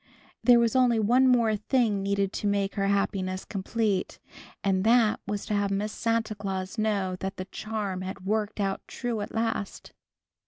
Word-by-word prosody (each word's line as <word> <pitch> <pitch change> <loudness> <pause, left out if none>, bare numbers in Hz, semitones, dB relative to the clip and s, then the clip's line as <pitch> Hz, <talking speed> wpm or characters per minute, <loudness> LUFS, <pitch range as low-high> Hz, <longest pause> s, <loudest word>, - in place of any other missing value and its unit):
There 245 -1 +7
was 235 0 +2
only 250 -3 +4
one 245 +5 +4
more 235 -4 +4
thing 215 -1 +1
needed 200 0 0
to 205 - -2
make 200 -1 0
her 195 -1 0
happiness 190 -2 -1
complete, 200 0 -1 0.5
and 190 -1 +1
that 225 -1 +4
was 205 0 -3
to - - -3
have 205 -1 +1
Miss 205 +2 -1
Santa 230 -1 0
Claus 195 0 -4
know 200 -4 0
that 190 0 -4
the 185 - -4
charm 210 -3 -4
had 190 0 -6
worked 215 +1 -1
out 195 -1 -1
true 240 -4 -3
at 205 - -5
last. 225 -2 -3
205 Hz, 170 wpm, -27 LUFS, 195-225 Hz, 0.5 s, There